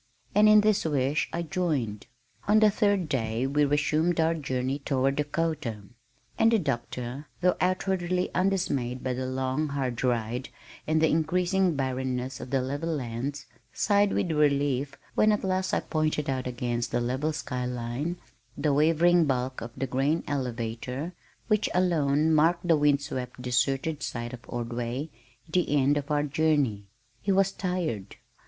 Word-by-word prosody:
And 210 +1 +6
in 215 0 +8
this 215 -1 +2
wish 145 -1 0
I 170 - -2
joined. 150 - -2 0.4
On 210 +1 +5
the 215 -1 +5
third 205 -4 +1
day 115 -4 -1
we 145 +2 +2
resumed 155 +4 +1
our 160 +1 +3
journey 135 -3 -2
toward 135 -1 0
Dakota, 150 -7 -2 0.6
and 225 - +5
the 230 - +5
Doctor, 130 - -3
though 180 0 +3
outwardly 185 -1 0
undismayed 145 -10 0
by 130 - -1
the 130 +1 -3
long 130 +3 -1
hard 130 -4 -2
ride 120 +1 -1 0.4
and 155 +1 +2
the - - +6
increasing 175 +3 +1
barrenness 130 -1 -2
of - - -7
the 130 -1 +1
level 145 +5 -3
lands, 135 0 -3 0.3
sighed 205 -1 +3
with 170 - 0
relief 140 -2 +1 0.2
when 215 - +4
at 210 - 0
last 185 0 0
I - - +1
pointed 155 -1 -1
out 130 -1 -2
against 120 -1 -2
the 120 - +1
level 130 +6 -1
sky 125 -5 -3
line 125 +8 -3 0.4
the 145 0 +1
wavering 165 +3 +4
bulk 130 -2 -1
of 115 - -5
the 135 - -1
grain 135 +6 0
elevator 125 +3 -3 0.3
which 215 -1 +2
alone 160 -4 +2
marked 170 +3 +3
the 165 - +5
wind 145 -1 +3
swept 125 -3 -5
deserted 135 +4 0
site 120 0 -4
of 125 - -7
Ordway, 120 +5 -4 0.4
the 160 -3 +1
end 140 +2 +3
of 145 0 -3
our 145 -1 +2
journey. 145 -9 +1 0.3
He 200 - 0
was 195 0 +3
tired. 170 - -3
145 Hz, 155 wpm, -27 LUFS, 125-170 Hz, 0.6 s, in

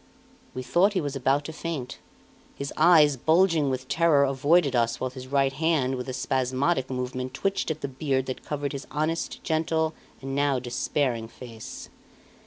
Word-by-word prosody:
We 130 - -4
thought 190 +10 +3
he 190 - +1
was 145 -4 -3
about 135 +2 +1
to 160 - -6
faint. 155 -6 -5 0.6
His 140 0 -5
eyes, 155 -4 +6
bulging 160 +1 +3
with 130 0 -3
terror, 160 -3 +4
avoided 140 +2 +3
us, 115 -1 +1
while 130 - -2
his 130 0 -9
right 135 0 +2
hand, 150 -3 +1
with 125 0 -4
a - - -3
spasmodic 130 +3 0
movement, 130 0 -4
twitched 195 +4 -1
at 155 -1 -3
the - - -2
beard 135 -1 -1
that 130 - -5
covered 145 -1 -3
his 140 0 -6
honest, 155 +2 -2
gentle, 160 0 0 0.3
and 135 0 -6
now 140 -1 +2
despairing 120 -1 -1
face. 115 -2 -10
140 Hz, 170 wpm, -26 LUFS, 130-160 Hz, 0.6 s, eyes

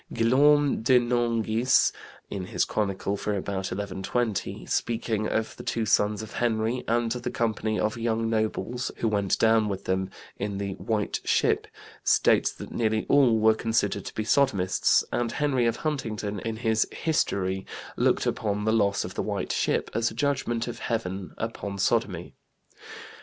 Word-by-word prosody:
Guillaume 140 +5 +4
de 125 +3 +5
Nangis, 120 0 +2 0.4
in 95 -2 -5
his - - 0
chronicle 100 -1 -1
for 105 0 -2
about 95 0 -3
1120, 100 +3 -2
speaking 110 -2 -1
of 110 0 -2
the - - -7
two 115 -1 -1
sons 105 +1 +2
of 110 - -9
Henry 115 +1 0
and 115 0 +1
the 120 0 -2
company 110 -1 -1
of 110 +2 -1
young 115 0 0
nobles 115 +2 -1
who 115 - 0
went 100 -3 +1
down 110 -1 +3
with 100 0 -4
them, 95 0 0 0.3
in 100 -1 -3
the 100 -1 -3
White 105 -2 -1
Ship, - - +1 0.4
states - - +3
that - - -10
nearly 110 -2 0
all 130 -5 +5
were 110 0 +5
considered 115 +1 -1
to - - -7
be 110 - -1
sodomists, 105 -7 +3
and 120 -1 -1
Henry 135 -5 +1
of 115 - +1
Huntingdon, 110 -9 -3
in 115 +2 -4
his 110 -1 +1
History, 95 - -1 0.3
looked - - +2
upon 105 -1 -1
the 110 - +2
loss 100 -3 +2
of - - -7
the - - -2
White - - -3
Ship - - 0
as 115 +1 +1
a - - -11
judgment 125 -3 -1
of 120 - -6
heaven 95 -5 -3
upon 105 -3 -4
sodomy. 95 -4 0
110 Hz, 160 wpm, -26 LUFS, 100-120 Hz, 0.4 s, de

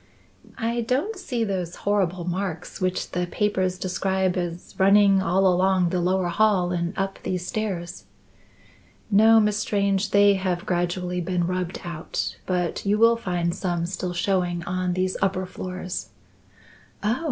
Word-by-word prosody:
"I 235 +1 -1
don't 270 - -1
see 250 -11 -2
those 185 -5 -3
horrible 190 -3 +1
marks 180 -1 -4
which 185 0 -1
the 180 0 -1
papers 185 -2 0
describe 190 0 0
as 175 -1 -4
running 195 0 +5
all 190 +1 +2
along 185 -1 +3
the 180 0 0
lower 180 0 +1
hall 180 -1 +2
and 170 +2 -2
up 195 0 -2
these 180 -1 -3
stairs." 175 - -4 1.1
"No, 220 +2 +7
Miss 210 -1 +2
Strange; 200 -2 0
they 200 0 +5
have 185 -1 -2
gradually 180 0 -1
been 175 0 -1
rubbed 180 0 -3
out, 170 -3 -4
but 180 -2 -1
you 205 +1 +2
will 230 +1 +5
find 175 -6 -1
some 175 -2 -2
still 180 0 -4
showing 175 -1 0
on 185 0 -1
these 185 +1 -1
upper 190 -1 +1
floors." 185 0 -6 0.9
"Oh! 225 +5 +1
185 Hz, 145 wpm, -24 LUFS, 175-200 Hz, 1.1 s, No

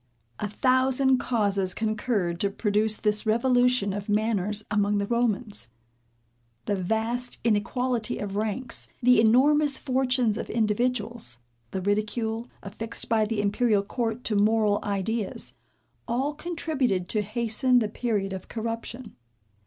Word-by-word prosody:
A 210 - -2
thousand 260 +3 +3
causes 200 -7 0
concurred 215 -5 -1
to 200 - +1
produce 210 +1 +1
this 210 +1 0
revolution 245 -2 +3
of 205 +1 -5
manners 210 -1 0
among 205 0 +2
the 200 - 0
Romans. 220 - -1 1.0
The 205 - 0
vast 225 +6 -1
inequality 235 +2 0
of 200 -1 -5
ranks, 220 +4 -2 0.2
the 250 -2 +6
enormous 280 +5 +4
fortunes 255 -4 +1
of - - -5
individuals, 225 - -1 0.3
the 190 - -3
ridicule, 220 +3 -1 0.2
affixed 225 +3 -4
by 220 -1 +3
the 210 -1 -1
imperial 210 0 +2
court 230 +2 -3
to 215 - -1
moral 210 0 +3
ideas, 205 +1 -3 0.5
all 265 +5 0
contributed 295 - -1
to 215 - +1
hasten 235 +4 +1
the 225 -3 +2
period 210 -3 -2
of 190 - -7
corruption. 230 +1 -5
220 Hz, 125 wpm, -26 LUFS, 205-245 Hz, 1.0 s, the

